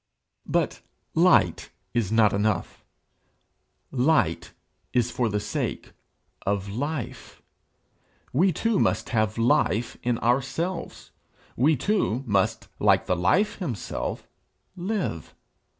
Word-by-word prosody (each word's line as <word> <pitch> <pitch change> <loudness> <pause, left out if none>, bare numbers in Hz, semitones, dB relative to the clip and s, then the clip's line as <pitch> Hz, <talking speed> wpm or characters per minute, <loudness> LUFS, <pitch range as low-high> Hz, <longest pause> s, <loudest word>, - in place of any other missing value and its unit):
But - - 0 0.3
light - - +4 0.2
is 115 -5 0
not 110 -2 +4
enough; 100 -3 -1 1.1
light 115 - +1 0.4
is 120 -1 +2
for 120 -2 0
the 105 0 0
sake - - -3 0.5
of 100 0 -1
life. 135 +4 -5 0.9
We 180 +8 +4
too 225 +6 0
must - - +1
have 110 -2 0
life 115 0 +2
in 120 -1 0
ourselves. 135 +10 -2 0.4
We 150 +6 +4
too 135 - 0
must, 100 -4 0
like - - +4
the 90 - +1
Life 180 - +2
himself, 135 - -4 0.5
live. 180 - -3
120 Hz, 105 wpm, -26 LUFS, 105-160 Hz, 1.1 s, light